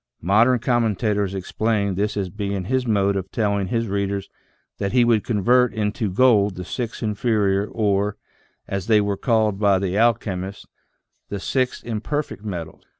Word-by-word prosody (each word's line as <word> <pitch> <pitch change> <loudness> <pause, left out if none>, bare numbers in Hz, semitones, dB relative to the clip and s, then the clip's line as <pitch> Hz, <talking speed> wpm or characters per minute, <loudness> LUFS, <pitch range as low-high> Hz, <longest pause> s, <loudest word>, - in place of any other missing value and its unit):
Modern 110 +8 +4
commentators 110 -5 0
explain 100 +1 -1
this 105 +3 -1
as 95 -3 -2
being 100 -2 -3
his 130 +3 0
mode 100 -2 +2
of 95 -1 -3
telling 100 -3 0
his 115 +3 -1
readers 100 0 -2 0.5
that 100 +1 -2
he 125 -1 +5
would 115 -3 +3
convert 120 +3 +2
into 105 0 -1
gold 105 -2 +3
the 90 - -6
six 120 -2 -4
inferior 105 -2 +1
or, 105 -2 0 0.5
as 100 -1 -4
they 110 -2 +5
were 100 -1 0
called 110 -2 +1
by 100 -2 +4
the 95 0 -2
alchem 110 -4 +1
ists, 100 - -13 0.6
the 100 - -4
six 130 +5 -1
imperfect 120 0 -3
metals. 85 -6 -6
105 Hz, 155 wpm, -22 LUFS, 100-115 Hz, 0.6 s, he